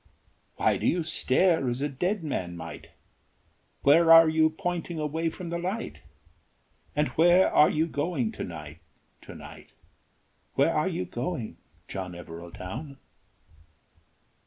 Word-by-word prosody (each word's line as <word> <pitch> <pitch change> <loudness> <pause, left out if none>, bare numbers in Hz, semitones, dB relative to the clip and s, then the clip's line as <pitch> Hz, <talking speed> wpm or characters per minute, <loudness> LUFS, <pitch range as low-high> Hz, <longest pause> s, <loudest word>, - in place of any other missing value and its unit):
Why - - +2
do - - -1
you 175 -1 +1
stare 160 -1 +2
as 120 +1 -2
a 145 - 0
dead 180 +8 -2
man 90 - -3
might? 80 -2 -9 0.9
Where 165 +4 +6
are 165 0 +9
you 160 0 +3
pointing 170 +1 -4
away 160 +2 -1
from 170 +1 -8
the 170 - -2
light? 190 +6 -4 0.9
And 150 0 +1
where 175 +3 +4
are 150 - +6
you 155 +1 +1
going 145 -6 -2
to - - -6
night, 80 -2 -8 0.4
to - - -11
night, - - -12 0.8
Where - - +3
are - - +1
you 90 - -3
going, 120 - -4 0.3
John 95 -2 -5
Evereldown?" 90 - -8
150 Hz, 135 wpm, -27 LUFS, -, 0.9 s, are